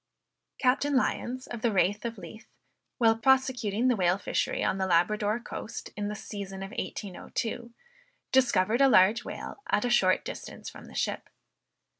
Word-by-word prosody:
Captain 280 +2 +2
Lyons 255 0 0
of 235 -2 -7
the 235 - +2
Raith 205 +2 +1
of 230 -1 -4
Leith, 195 +5 -11 0.5
while 225 -2 +4
prosecuting 245 -2 +2
the 250 - +4
whale 180 -2 +2
fishery 200 - -1
on 195 - 0
the 190 - 0
Labrador 205 +5 +2
coast, 230 -1 -7
in 205 0 -3
the 210 - -4
season 195 -2 -7
of 195 - -7
1802, 215 +5 -5 0.6
discovered 240 -3 +3
a 275 - +7
large 215 +2 +5
whale - - -7
at 210 - +2
a 245 - 0
short 185 -6 +3
distance - - -7
from - - -12
the - - -13
ship. - - -2
220 Hz, 160 wpm, -28 LUFS, 195-245 Hz, 0.6 s, a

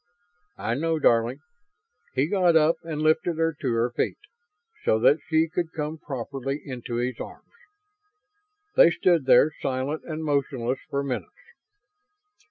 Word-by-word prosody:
"I 115 - -2
know, 160 +5 0
darling." 120 0 +2 0.7
He 135 +2 +3
got 180 -1 +2
up 160 +1 +4
and 155 -2 -4
lifted 160 +1 +2
her 165 -1 +1
to 130 -4 0
her 115 +1 +1
feet, - - -1 0.7
so 110 - +3
that 140 +7 +4
she 160 0 +2
could 170 0 -3
come 155 0 -4
properly 135 0 -4
into 125 -4 -6
his 120 0 -2
arms. - - -10 1.2
They - - +8
stood 170 -4 +2
there, 130 +4 +6
silent 135 +3 -2
and 160 -1 -5
motionless, 135 -4 -1
for 140 0 -1
minutes. 140 - -6
145 Hz, 140 wpm, -25 LUFS, 130-160 Hz, 1.2 s, They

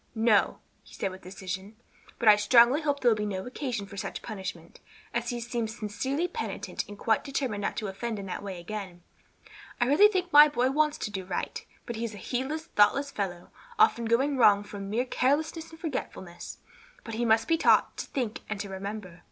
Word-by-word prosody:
"No," 220 -2 +3 0.2
he - - -16
said 195 - -2
with 185 0 -11
decision; 190 +2 -7 0.4
"but 235 - -1
I 210 - +10
strongly 235 +6 +5
hope 285 -2 -1
there 245 - +5
will - - +3
be 210 - -3
no 190 -2 -3
occasion 250 -5 -4
for 200 0 -11
such - - -5
punishment, 200 -4 -7 0.3
as - - -1
he 240 -2 -2
seems 235 -1 -3
sincerely 265 +10 -2
penitent 460 +4 -4
and 205 - -10
quite 220 +1 +1
determined 265 -7 -2
not - - -2
to 215 - -2
offend 220 +4 -4
in 200 - -6
that 185 - -5
way 195 -3 -6
again. 185 -2 -7 0.8
I 240 - +3
really 295 +11 +7
think 365 -5 -2
my 295 +1 +10
boy 260 -3 +1
wants 300 +1 +2
to 210 - -4
do 190 -2 -4
right, 180 -1 -4 0.2
but 235 - -5
he 230 - -3
is 225 -2 -4
a - - -9
heedless, 265 - -3
thoughtless 280 +4 +3
fellow, 180 -6 -4 0.3
often 430 - +4
going 265 +5 +2
wrong 205 -4 +5
from 200 -1 -7
mere 235 +5 0
carelessness 310 +6 0
and 325 - -14
forgetfulness. 190 - -6 0.5
But 225 - -7
he 230 +2 -1
must 225 -1 +3
be 330 -1 +2
taught - - +4
to - - -5
think 240 -5 -3
and 215 -1 -3
to 200 - -5
remember." 190 -2 -6
225 Hz, 205 wpm, -28 LUFS, 200-270 Hz, 0.8 s, I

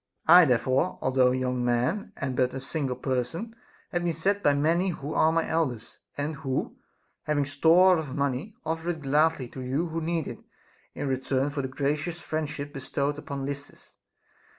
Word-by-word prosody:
I 175 +2 +9
there 125 -5 +4
fore, 135 +9 0
although 130 -1 +3
a 130 - 0
young 125 -1 -1
man 125 - 0
and 130 -4 -3
but 125 0 +1
one 135 - -4
single 135 -1 -2
person, 130 - -3 0.4
have 175 0 -1
been 170 -1 0
sent 195 +6 0
by 145 -5 +3
many 165 +6 +2
who 150 -3 -5
are 160 - +4
my 165 0 +1
elders, 130 -9 -2 0.2
and 145 +1 -2
who, 135 -1 -3 0.5
having 145 -2 +1
store 165 +6 +5
of 145 -4 -5
money, 140 +8 -2
offer 165 +1 -2
it 160 -3 -3
gladly 145 -1 +2
to 130 - -8
you 140 +7 -1
who 165 +1 -3
need 165 -1 -1
it, - - -7 0.6
in - - -3
return 135 +1 0
for 140 -1 -2
the 130 - -3
gracious 145 +5 -2
friendship 145 -2 -4
bestowed 140 +1 -2
upon 140 -2 -5
Lysis. 140 +1 -8
145 Hz, 180 wpm, -27 LUFS, 130-165 Hz, 0.6 s, I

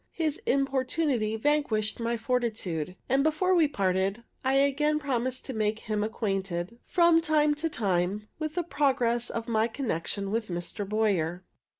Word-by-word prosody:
His 315 -3 0
importunity 265 -3 +1
vanquished 225 -5 +1
my 235 0 -1
fortitude; 220 -9 -2
and 270 +2 +3
before 315 +5 +2
we 335 -4 +5
parted, 195 -2 0 0.2
I 265 +1 +2
again 285 +2 +3
promised 260 -3 -2
to 265 - -4
make 215 -1 0
him 215 -1 -2
acquainted, 195 -2 -2
from 340 -2 +5
time 305 -2 +3
to 315 +2 -2
time, 200 - 0
with 310 0 -3
the 350 - 0
progress 255 -6 +1
of 230 0 -4
my 220 -1 +2
connection 200 - -3
with 225 0 -1
Mr. 180 +3 -4
Boyer. 190 -5 0
235 Hz, 150 wpm, -28 LUFS, 210-290 Hz, 0.2 s, we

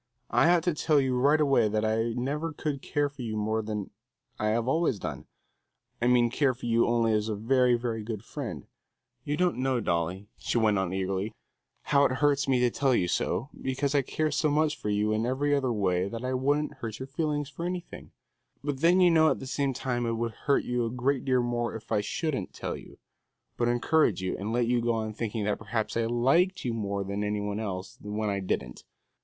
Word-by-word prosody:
I 120 +8 +4
ought 175 -2 +4
to 175 - +1
tell 150 0 +2
you 130 -2 +1
right 140 +5 +4
away 135 -7 +4
that 105 +1 0
I 115 +1 +1
never 145 +7 -2
could 150 -3 -3
care 145 0 0
for 145 -1 -10
you 110 -3 -3
more 110 +1 0
than 105 -2 -4 0.5
I 110 0 +1
always 130 +5 +1
have 100 - -13
done; - - -5 0.8
I 120 - +2
mean 120 -1 +4
care 135 -1 +2
for 120 - -9
you 115 0 +3
only 115 -1 +2
as 105 +1 0
a 110 - -1
very, 125 +3 +3
very 115 -2 -2
good 110 -1 -5
friend. 115 - -6 0.6
You 145 +1 -2
don't 180 -6 +1
know, 130 -1 +1
Dolly," 90 0 -1
she - - -1
went 105 -3 +3
on 95 -2 -1
eagerly, 95 +2 -2 0.5
"how 140 -1 +3
it 130 - +2
hurts 145 +1 +2
me 130 -2 +3
to 125 -1 +3
tell 135 -1 +2
you 90 - +1
so, 120 +9 -1
because 135 +2 -1
I 145 - +4
care 155 +3 -1
so 155 +1 +1
much 150 +1 +2
for 105 - -4
you 105 +1 +1
in 110 +2 0
every 145 +3 +1
other 135 -3 +1
way 95 -3 +1
that 115 +3 -5
I 130 - -1
wouldn't 145 +4 0
hurt 115 -2 -5
your 130 - -5
feelings 145 0 -2
for 155 +5 -6
anything; 180 0 -5 0.5
but 145 -2 -2
then 175 +4 +5
you 180 -1 +6
know 160 -1 +5
at 135 - +1
the - - -7
same 140 +1 0
time 120 -2 -2
it 115 - 0
would 115 0 -2
hurt 140 +5 0
you 125 -1 -1
a 115 - -1
great 125 +2 -1
deal 130 -2 +2
more 120 -1 -1
if 110 +1 -10
I 105 - +2
shouldn't 130 - -3
tell - - -4
you, - - -12 0.6
but 120 - 0
encourage 120 - +2
you, 95 - -1
and 105 +3 -4
let 120 +1 +2
you 120 0 +1
go 120 0 +1
on 110 -1 -2
thinking 110 -1 -3
that 105 0 -1
perhaps 110 0 -3
I 115 0 +1
liked 135 +12 +2
you 120 - 0
more 100 -3 -2
than 100 +1 -3
any 105 0 -1
one 105 0 -3
else, 95 -4 -5
when 105 0 -2
I 100 - -1
didn't. 60 -10 -3
120 Hz, 225 wpm, -28 LUFS, 110-140 Hz, 0.8 s, you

